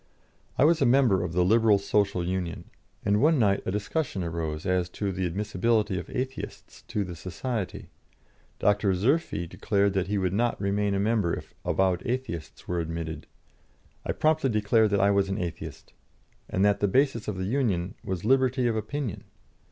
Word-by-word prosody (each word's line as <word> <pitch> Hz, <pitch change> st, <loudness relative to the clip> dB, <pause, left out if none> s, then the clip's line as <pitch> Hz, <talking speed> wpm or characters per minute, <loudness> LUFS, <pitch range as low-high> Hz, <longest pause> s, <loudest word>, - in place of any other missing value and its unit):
I 140 Hz, -, +5 dB
was 165 Hz, 0 st, +4 dB
a 135 Hz, -, +5 dB
member 120 Hz, -8 st, +4 dB
of 85 Hz, -, -4 dB
the 90 Hz, 0 st, +3 dB
"Liberal 110 Hz, +1 st, +5 dB
Social 100 Hz, -2 st, +1 dB
Union," 90 Hz, -1 st, -3 dB, 0.4 s
and 105 Hz, +1 st, +3 dB
one 155 Hz, +2 st, +4 dB
night 100 Hz, -5 st, +3 dB
a -, -, +1 dB
discussion 105 Hz, -, -2 dB
arose 80 Hz, -2 st, -3 dB
as 90 Hz, -2 st, +1 dB
to 100 Hz, -2 st, -1 dB
the 95 Hz, -1 st, -1 dB
admissibility 105 Hz, +2 st, 0 dB
of 85 Hz, -, -8 dB
Atheists 130 Hz, +1 st, -5 dB
to 105 Hz, -, -1 dB
the 90 Hz, -2 st, -7 dB
Society. 95 Hz, +5 st, -4 dB, 0.7 s
Dr. 100 Hz, -1 st, +2 dB
Zerffi 120 Hz, -, +1 dB
declared 100 Hz, +2 st, 0 dB
that 95 Hz, -1 st, 0 dB
he 105 Hz, +1 st, 0 dB
would 95 Hz, -2 st, 0 dB
not 120 Hz, +3 st, +1 dB
remain 100 Hz, 0 st, 0 dB
a -, -, 0 dB
member 105 Hz, -4 st, +1 dB
if -, -, -10 dB
avowed 95 Hz, -2 st, +1 dB
Atheists 120 Hz, -9 st, -4 dB
were 90 Hz, -1 st, -1 dB
admitted. 80 Hz, -1 st, -4 dB, 0.8 s
I -, -, -1 dB
promptly 155 Hz, -3 st, +2 dB
declared 110 Hz, 0 st, +3 dB
that 100 Hz, -1 st, +1 dB
I 100 Hz, +1 st, +4 dB
was 100 Hz, -1 st, +2 dB
an 95 Hz, -, -1 dB
Atheist, 85 Hz, -2 st, -6 dB, 0.6 s
and 95 Hz, +2 st, +2 dB
that 100 Hz, 0 st, +3 dB
the 100 Hz, -, +2 dB
basis 130 Hz, +1 st, +1 dB
of 105 Hz, -3 st, -3 dB
the 95 Hz, -, -2 dB
union 100 Hz, -7 st, 0 dB
was 95 Hz, -1 st, -4 dB
liberty 130 Hz, 0 st, +3 dB
of 115 Hz, -2 st, +1 dB
opinion. 110 Hz, 0 st, -4 dB
100 Hz, 175 wpm, -27 LUFS, 90-115 Hz, 0.8 s, I